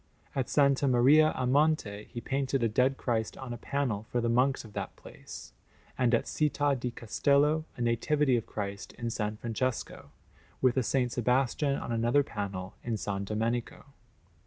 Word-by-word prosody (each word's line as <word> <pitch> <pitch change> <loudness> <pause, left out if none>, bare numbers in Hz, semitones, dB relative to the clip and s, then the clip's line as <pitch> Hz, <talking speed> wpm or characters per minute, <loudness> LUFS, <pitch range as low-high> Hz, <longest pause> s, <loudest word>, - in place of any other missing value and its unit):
At 135 +1 -3
S. 140 -2 +4
Maria 140 +4 +5
a 130 - -1
Monte 130 -7 +1
he 120 - -7
painted 135 -1 -1
a - - +4
Dead 125 +5 +2
Christ 110 -3 -2
on 130 -3 -6
a - - -6
panel 120 -6 -2
for 120 - 0
the 115 0 0
monks 125 +2 +2
of 105 - -13
that - - -5
place; - - -11 0.4
and 125 -1 +3
at - - 0
Città 145 -2 +1
di 125 - -2
Castello 140 +7 +1
a - - -6
Nativity 130 +4 +2
of 115 - -2
Christ 100 -1 -5
in 120 - -7
S. 115 0 -3 0.2
Francesco, 120 +1 -3 0.5
with 130 -2 +3
a - - +3
S. 125 0 0
Sebastian 130 +3 +1
on 120 - -5
another 120 +5 +3
panel 100 -6 -5
in 120 - -2
S. 110 - -3 0.2
Domenico. 115 +3 -2
125 Hz, 170 wpm, -30 LUFS, 115-140 Hz, 0.5 s, Maria